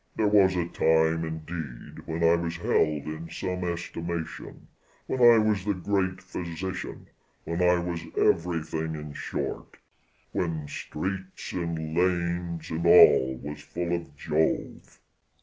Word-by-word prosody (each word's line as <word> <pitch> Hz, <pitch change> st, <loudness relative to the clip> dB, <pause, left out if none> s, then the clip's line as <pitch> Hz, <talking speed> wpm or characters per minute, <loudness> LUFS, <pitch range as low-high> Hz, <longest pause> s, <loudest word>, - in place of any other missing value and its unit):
There 110 Hz, -, +2 dB
was 100 Hz, -3 st, +5 dB
a 85 Hz, -2 st, 0 dB
time, 80 Hz, 0 st, +2 dB
indeed, 80 Hz, -5 st, -7 dB
when 80 Hz, +1 st, -2 dB
I 85 Hz, 0 st, +6 dB
was 85 Hz, 0 st, -1 dB
held 75 Hz, -3 st, +1 dB
in 80 Hz, +2 st, -6 dB
some 90 Hz, +2 st, -3 dB
estimation, 85 Hz, -1 st, -5 dB, 0.4 s
when 130 Hz, -, -2 dB
I 120 Hz, -1 st, +8 dB
was 105 Hz, -3 st, +2 dB
the 105 Hz, 0 st, 0 dB
great 95 Hz, 0 st, -1 dB
physician, 90 Hz, 0 st, -5 dB, 0.4 s
when 85 Hz, +2 st, -2 dB
I 90 Hz, 0 st, +5 dB
was 85 Hz, -1 st, -3 dB, 0.2 s
everything, 80 Hz, -2 st, +1 dB
in 75 Hz, -1 st, -7 dB
short -, -, -5 dB, 0.5 s
"When 80 Hz, -4 st, -2 dB
streets, 95 Hz, +6 st, -5 dB
and 80 Hz, -3 st, -3 dB
lanes, 85 Hz, -1 st, 0 dB
and 80 Hz, +1 st, -2 dB
all 65 Hz, -6 st, +7 dB
was 75 Hz, 0 st, -6 dB
full 85 Hz, +3 st, -2 dB
of 85 Hz, -4 st, -7 dB
Jove." 80 Hz, +1 st, -1 dB
85 Hz, 130 wpm, -27 LUFS, 80-90 Hz, 0.5 s, I